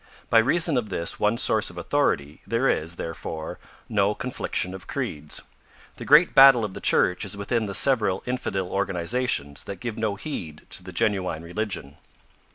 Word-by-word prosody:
By 115 - +7
reason 155 +5 +2
of 110 -4 -2
this 85 -3 -2
one 105 +2 +2
source 110 -2 +3
of 90 - -12
authority, 85 - -1
there 115 +4 +1
is, 85 -5 -1
therefore, 80 -1 -6 0.3
no 105 -1 +1
confliction 100 -7 -3
of 95 -1 -10
creeds. 75 0 -4 0.6
The - - -7
great 150 +5 +6
battle 135 -4 +8
of 100 - -6
the - - -8
Church 90 +3 +3
is 100 -1 -3
with 100 0 -7
the 110 -5 0
several 105 -8 +2
infidel 110 -7 -2
organizations 95 - -2
that 100 - -7
give 120 -2 -5
no 110 -2 -1
heed 95 - -7
to - - -8
the - - -10
genuine 95 -7 0
religion. 90 -6 -4
100 Hz, 165 wpm, -25 LUFS, 90-120 Hz, 0.6 s, battle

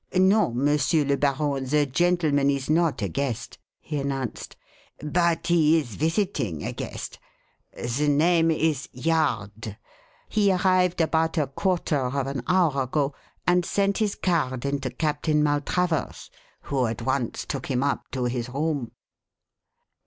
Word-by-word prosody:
"No, 190 - +4
Monsieur 145 +4 +2
le 140 0 +2
Baron, 140 0 0
the 145 +2 +2
gentleman 150 -1 +2
is 140 +1 -1
not 160 -7 +2
a - - +1
guest," 120 +4 -4 0.2
he 150 -2 -4
announced. 135 -3 -4 0.4
"But 170 +2 0
he 165 -2 +4
is 125 -8 -3
visiting 160 - -1
a - - -3
guest. - - -6 0.6
The 125 +5 -1
name 165 +3 +3
is 155 -4 0
Yard. 115 -8 -1 0.5
He 205 -2 +2
arrived 180 -1 +2
about 160 +1 +1
a 150 - +3
quarter 170 +2 0
of 130 +1 -1
an 135 -2 -3
hour 170 -7 +3
ago 140 +2 -1 0.3
and 180 0 +3
sent 200 +3 0
his 210 -2 0
card 130 -8 -1
in 140 0 0
to 135 -1 -3
Captain 150 +3 0
Maltravers, 150 +3 -1 0.3
who 130 -3 0
at 110 -1 -4
once 130 -3 -1
took 135 -3 -4
him 130 -1 0
up 140 - -1
to 130 -2 -3
his 120 0 -2
room." 140 -2 -2
145 Hz, 145 wpm, -25 LUFS, 135-165 Hz, 0.6 s, No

